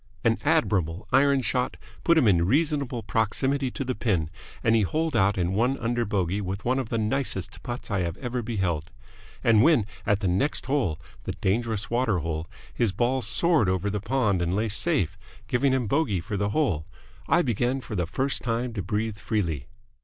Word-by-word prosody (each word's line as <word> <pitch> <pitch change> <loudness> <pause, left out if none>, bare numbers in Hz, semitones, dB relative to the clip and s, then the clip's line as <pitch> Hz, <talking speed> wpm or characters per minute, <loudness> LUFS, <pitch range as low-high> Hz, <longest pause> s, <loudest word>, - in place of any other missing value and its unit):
An - - +2
admirable 90 -2 +1
iron 140 0 +4
shot 125 +3 -1 0.3
put 170 -1 +4
him 135 -8 +5
in 85 -4 +4
reasonable 140 - +1
proximity 130 +6 0
to 135 - -4
the 130 - -1
pin, 90 -11 0 0.3
and 110 - +4
he 110 - +4
holed 155 - 0
out 100 +1 +3
in 90 0 0
one 125 +6 +2
under 120 0 -1
bogey 100 -1 0
with 95 +1 -4
one 130 +2 +2
of 125 -4 -4
the 115 - -1
nicest 110 -3 -2
putts 120 -2 -6
I 100 - +1
have 85 -2 -2
ever 125 -1 -3
beheld. 95 -9 -2 0.5
And 110 -2 +5
when 145 -6 +5 0.2
at 105 0 +1
the 95 - 0
next 95 +12 +1
hole, 130 - 0 0.3
the - - -2
dangerous 110 +2 -1
water 120 -5 +2
hole, 80 0 -3 0.3
his 115 -4 +1
ball 120 +7 +1
soared 120 - +2
over 95 +2 0
the 105 -1 -2
pond 110 -5 +1
and 85 +2 0
lay 110 +2 0
safe, 100 - 0 0.3
giving 130 +3 +2
him 130 -2 +1
bogey 110 - +1
for 95 +5 -5
the 100 +1 0
hole, 100 - 0 0.4
I 175 +1 +4
began 120 +2 0
for 110 -4 -7
the 90 -3 0
first 135 +9 -1
time 120 +1 -1
to 105 - -3
breathe 105 +3 -2
freely. 85 - -2
110 Hz, 190 wpm, -26 LUFS, 95-130 Hz, 0.5 s, him